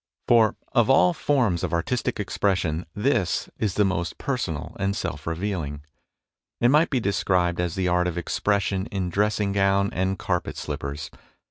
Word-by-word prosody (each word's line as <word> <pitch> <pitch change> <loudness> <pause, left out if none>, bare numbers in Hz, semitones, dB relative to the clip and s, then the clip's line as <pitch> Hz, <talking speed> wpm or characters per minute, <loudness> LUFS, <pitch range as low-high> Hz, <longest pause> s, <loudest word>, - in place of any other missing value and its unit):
For 115 -3 +5 0.2
of 120 +1 +3
all 155 +6 +5
forms 125 - +1
of - - -2
artistic 110 +7 -1
expression, 90 -5 0
this 115 -4 0
is 105 -4 -1
the 105 - +3
most 85 -2 -2
personal 85 - -3
and 100 0 0
self 80 -8 -4
revealing. 80 -4 -3 0.8
It 120 - +4
might 150 +5 +4
be 130 - +1
described 90 -4 +1
as 90 -2 -2
the 95 -1 0
art 90 0 +2
of 90 -1 -3
expression 100 +3 0
in 95 -3 -3
dressing 105 +1 +1
gown 100 0 +2
and 95 +2 0
carpet - - -2
slippers. 70 +2 -5
95 Hz, 155 wpm, -25 LUFS, 85-105 Hz, 0.8 s, For